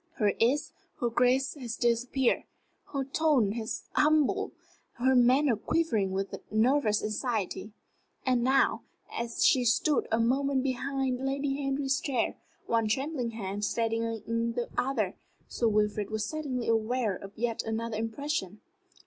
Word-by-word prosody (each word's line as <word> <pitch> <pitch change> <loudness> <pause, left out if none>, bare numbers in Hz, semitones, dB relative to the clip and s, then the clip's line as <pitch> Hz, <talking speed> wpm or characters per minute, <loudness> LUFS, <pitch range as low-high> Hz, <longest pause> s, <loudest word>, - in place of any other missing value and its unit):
Her 210 -4 +1
ease, 255 +6 +2 0.3
her 240 -4 0
grace 255 +3 +2
had 255 -5 -8
disappeared. 240 +2 +1 0.5
Her 275 -2 -1
tone 270 -7 +2
was 225 -2 -4
humble, 300 -2 +3 0.4
her 260 +2 +2
manner 255 +1 +5
quivering 225 -5 0
with 195 +1 -2 0.2
nervous 220 0 +2
anxiety. 215 -1 -2 0.5
And 250 -2 +2
now, 265 +2 +3 0.3
as 235 0 -1
she 255 - +5
stood 260 +5 +2
a 225 - +2
moment 265 +3 +2
behind 265 0 -1
Lady 275 +1 -1
Henry's 275 0 0
chair, 255 -5 0 0.3
one 230 -1 +1
trembling 265 +2 -1
hand 205 -2 -5
steadying 230 +1 -1
the 240 -1 -2
other, 225 -7 0 0.3
Sir 235 - 0
Wilfrid 210 -1 +1
was 215 -1 -2
suddenly 280 -6 -3
aware 225 -1 +1
of 195 +2 -10
yet 230 0 -1
another 225 0 -3
impression. 225 -3 -3
240 Hz, 130 wpm, -29 LUFS, 220-270 Hz, 0.5 s, manner